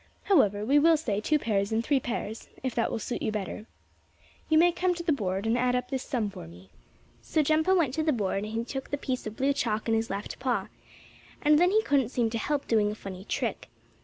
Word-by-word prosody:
However, 210 - +3
we 280 +5 +4
will 325 +2 +5
say 215 -9 -2
two 305 +7 +2
pears 205 -6 -1
and 225 +1 +1
three 280 +1 +2
pears, 225 -3 -5
if 260 -2 -2
that 230 - 0
will - - -2
suit 230 +2 -4
you 220 - -1
better. 210 +1 -5 0.8
You 315 - +4
may 350 +2 +6
come 360 +1 0
to 340 - -5
the 335 - +1
board 195 -7 -1
and 225 +1 +2
add 250 0 +1
up 250 - -2
this 265 -2 -1
sum 230 -8 -2
for 80 - -9
me." 90 +3 -15 0.5
So 310 - +1
Jumpo 315 +5 +3
went 295 -7 +1
to 315 - 0
the 310 - +2
board, 205 -8 -1
and 210 - -4
he 225 +2 -2
took 270 +2 -5
the 285 - -1
piece 255 -4 -3
of 215 - -7
blue 275 +2 +2
chalk 225 -6 -1
in 225 - +2
his 225 0 0
left 200 +2 -5
paw. 245 -7 -1 0.7
And 300 0 +5
then 355 +1 +5
he 435 +3 +3
couldn't 275 - +2
seem 235 -3 0
to 230 - -2
help 285 +4 -2
doing 215 -2 +3
a - - -5
funny 190 -2 -8
trick. - - -3
245 Hz, 245 wpm, -28 LUFS, 215-295 Hz, 0.8 s, may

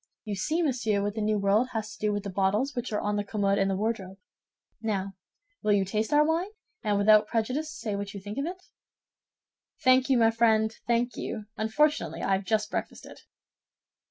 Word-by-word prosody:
You 210 - -3
see, 305 - 0
monsieur, 225 -8 0
what 205 0 -1
the 220 - -3
New 215 0 +1
World 205 +5 +2
has 220 -1 -3
to 235 - -14
do 210 0 +1
with 205 -1 -2
the 200 - -5
bottles 200 +8 +1
which 245 -1 -4
are 210 - 0
on 210 0 -1
the 205 - 0
commode 200 -1 0
and 195 0 +2
the 195 - 0
wardrobe. 195 -2 -3 0.6
Now, 200 -3 -2 0.5
will 210 - +2
you 200 -1 +2
taste 215 +6 -2
our 300 0 +5
wine, 330 +5 0 0.3
and 210 -2 +1
without 210 +1 +5
prejudice 255 +7 -1
say 225 -8 -4
what 200 0 -4
you - - -5
think 205 +5 -6
of 280 - -1
it?" 365 +1 -7 1.2
"Thank 255 +1 +5
you, 265 - +4
my 225 -1 +5
friend, 225 -1 +2
thank 240 0 +1
you; 215 - -5
unfortunately, 220 - 0
I - - 0
have 195 0 +1
just 210 0 0
breakfasted." - - -5
215 Hz, 200 wpm, -28 LUFS, 200-240 Hz, 1.2 s, our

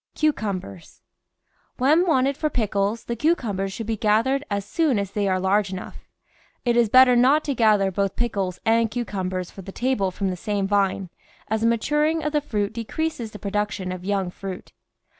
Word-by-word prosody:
CUCUMBERS 200 - -3 0.7
When 310 +8 +3
wanted 275 -3 +2
for 305 +2 -1
pickles 210 -2 -1
the 235 - -3
cucumbers 225 - 0
should 225 +3 -5
be 225 0 -2
gathered 230 +7 +2
as 200 -1 -2
soon 285 +3 +1
as 200 -1 -2
they 205 -1 -1
are 185 -1 +1
large 195 +1 +1
enough. 185 -1 -8 0.6
It 240 -1 +2
is 235 -2 +3
bet 255 +3 +8
ter 250 - +3
not 265 +5 +4
to 285 - -1
gather 210 -5 +3
both 195 +1 -1
pickles 195 -6 -2
and 225 0 +3
cucumbers 190 -6 -3
for 195 - -10
the 195 - -9
table 240 -4 0
from 190 +1 -2
the - - -3
same 200 +2 -2
vine, 195 -2 0 0.4
as 220 0 0
the 230 - +3
maturing 300 +7 +1
of 300 - -1
the 300 - +2
fruit 210 -7 -2
decreases 235 +2 -3
the 210 - -10
production 205 -2 -2
of 185 -1 -6
young 195 -2 -1
fruit. 190 0 -8
210 Hz, 185 wpm, -23 LUFS, 195-250 Hz, 0.7 s, bet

